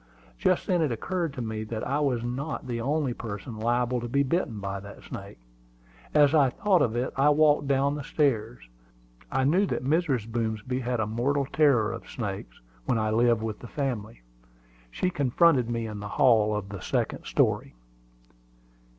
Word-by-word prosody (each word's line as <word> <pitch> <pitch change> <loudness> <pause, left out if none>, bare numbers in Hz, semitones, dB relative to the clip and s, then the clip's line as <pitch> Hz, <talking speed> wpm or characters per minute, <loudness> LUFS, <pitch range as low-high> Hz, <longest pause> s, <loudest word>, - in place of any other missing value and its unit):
Just - - +2
then 180 -2 +1
it 150 -5 +1
occurred 170 - -2
to 125 - -4
me 110 -1 -4
that 110 0 -4
I 140 +3 0
was 130 -5 0
not 130 +6 -4
the 120 -2 -3
only 140 0 0
person 110 0 -7
liable 120 +2 +1
to 120 - -4
be 140 +4 +2
bitten 130 - -1
by 100 0 -4
that 100 +1 -11
snake. - - -9 0.8
As 145 0 +6
I 145 -4 +5
thought 190 - +2
of 115 -1 +1
it, 125 +2 -1
I 135 +2 +4
walked 150 -1 +4
down 140 +1 +2
the 145 -1 -5
stairs. 120 - -1 0.6
I 130 0 +1
knew 180 +9 +3
that 125 - -3
Mrs. 140 -7 +1
Boomsby 115 +2 -2
had 125 -1 -2
a 110 - +1
mortal 130 +6 0
terror 135 -7 +3
of 115 - -9
snakes 95 - -5 0.3
when 120 - +1
I 110 -1 0
lived 115 0 +3
with 110 -2 -4
the 120 - -9
family. 110 - -4 0.7
She 180 - -1
confronted 140 -3 +3
me 115 -1 -2
in 105 -2 -6
the 105 - -6
hall 110 -1 +3
of 100 -2 -4
the 100 -1 -6
second - - -2
story. - - +1
120 Hz, 180 wpm, -27 LUFS, 110-140 Hz, 0.8 s, As